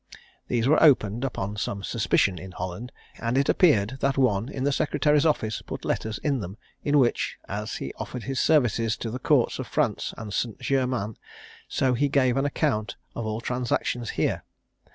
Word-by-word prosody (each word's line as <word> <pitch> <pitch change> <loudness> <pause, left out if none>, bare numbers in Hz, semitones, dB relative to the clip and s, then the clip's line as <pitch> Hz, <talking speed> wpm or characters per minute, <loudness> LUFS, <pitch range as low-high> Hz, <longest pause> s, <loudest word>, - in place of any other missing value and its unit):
These 120 0 +1
were 155 +3 +4
opened 120 -6 +4
upon 105 -6 -3
some 100 -1 -3
suspicion 100 -5 +1
in 95 +2 -9
Holland, 95 +7 -5 0.3
and 115 +2 0
it 140 - +2
appeared 130 - +3
that 135 0 +1
one 120 -3 +2
in 135 -2 -4
the 145 - +2
secretary's 150 +2 +2
office 110 -8 0
put - - -7
letters 110 -1 -1
in 140 -3 +1
them, 95 0 -6 0.3
in 145 0 +3
which, 125 -4 +2
as - - -4
he - - -5
offered 125 -2 -6
his 135 -1 -2
services 115 -7 +2
to 115 - -4
the 125 - -4
courts 135 -2 +2
of 130 - -4
France 135 -9 0
and 105 -2 -6
St. 115 -1 -1
Germains, 125 -6 -1 0.5
so 130 -1 +1
he 140 +4 +1
gave 130 -3 +3
an 135 +1 +1
account 135 -6 0 0.2
of 115 - -3
all 110 +1 -3
transactions 125 -1 -1
here. - - +1
125 Hz, 180 wpm, -26 LUFS, 110-135 Hz, 0.5 s, were